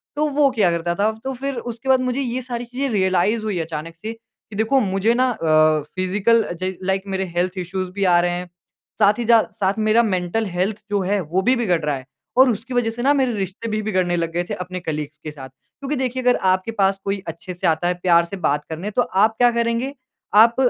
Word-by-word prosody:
तो 300 +1 +1
वो 285 -1 +3
किया 215 -8 +2
करता 170 0 -1
था। 210 +4 +2
तो 270 - -3
फिर 270 +1 -4
उसके 235 +2 -6
बाद 260 -1 +5
मुझे 255 +1 -1
ये 255 -1 -2
सारी 245 -1 -5
चीज़ें 260 +3 -2
रियलाइज़ 190 +3 +2
हुई 210 -4 -2
अचानक 165 0 -5
से 220 - -4
कि 225 -2 -17
देखो 225 +6 +2
मुझे 195 +1 +1
ना 255 +1 +2
अ, 155 -7 +3
फिज़िकल 205 +5 +2
अ, 175 - -5
ज 185 0 -1
लाइक 190 +1 0
मेरे 190 0 -2
हेल्थ 180 +1 +1
इश्यूज़ 185 +1 -3
भी 200 +2 -3
आ 175 -2 +5
रहे 175 0 +1
हैं। 180 0 -4 0.5
साथ 205 0 +6
ही 240 - -1
ज, 235 - +3 0.2
साथ 195 0 0
मेरा 215 +2 +4
मेंटल 190 +1 -1
हेल्थ 195 +3 -2
जो 205 -1 +1
है 200 +2 0
वो 175 +3 -1
भी 250 +6 +3
बिगड़ 185 -9 +1
रहा 150 -1 0
है। 130 -1 -8 0.3
और 260 0 +7
उसकी 235 +4 -3
वज़ह 240 -2 +1
से 235 +2 -6
ना 280 +2 +4
मेरे 265 -4 +1
रिश्ते 195 +4 -4
भी 215 0 -1
बिगड़ने 185 -4 0
लग 165 -1 -1
गए 175 +1 0
थे - - -2
अपने 180 0 -5
कलीग्स 150 -3 -5
के 155 - -5
साथ। 135 -3 -10
क्योंकि 275 - -7
देखिए 255 -1 -2
अगर 250 0 +4 0.2
आपके 185 +4 -1
पास 195 -2 +1
कोई 200 0 -1
अच्छे 165 +3 -6
से 175 - -2
आता 160 +2 +1
है 180 - +2
प्यार 170 -2 +5
से 195 +3 -7
बात 145 +1 0
करने 170 +6 -4
तो 230 - +2
आप 215 0 +2
क्या 245 -1 +5
करेंगे? 235 +3 -1 0.4
आप 225 +3 +7
200 Hz, 240 wpm, -21 LUFS, 175-235 Hz, 0.5 s, और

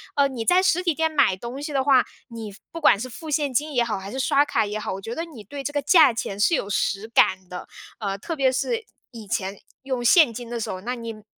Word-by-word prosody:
呃， 280 -1 +4
你 240 -4 -5
在 360 +1 +5
实 365 -1 +2
体 340 -3 +2
店 320 +1 0
买 280 -11 +3
东 240 +7 -7
西 295 0 -5
的 270 - +1
话， 265 -2 +5 0.2
你 225 -3 -7
付 195 - -15
不 330 - -6
管 205 - +5
是 255 +2 -5
付 315 +5 -9
现 290 -3 0
金 295 +4 0
也 240 - +3
好， 225 -3 -2
还 195 +1 -8
是 265 - -4
刷 280 +2 +3
卡 220 - +1
也 210 +1 -4
好， 210 - -4
我 195 - -6
觉 230 +4 -6
得 330 - -3
你 265 -11 -12
对 275 +7 -7
这 290 - -3
个 290 - 0
价 315 -8 +6
钱 200 -3 -4
是 235 +11 +3
有 200 - -3
实 205 +1 -1
感 190 -5 +2
的。 180 0 -7 0.3
呃， 200 -2 -3
特 325 - -5
别 265 -2 +2
是， 455 - -1 0.3
以 230 -3 -10
前 190 +1 -2 0.3
用 260 -2 -3
现 270 0 +6
金 235 +1 -7
的 240 -1 -4
时 - - -4
候， 185 0 -5
那 245 +4 -3
你 225 -3 -8
245 Hz, 290 characters per minute, -24 LUFS, 215-290 Hz, 0.3 s, 价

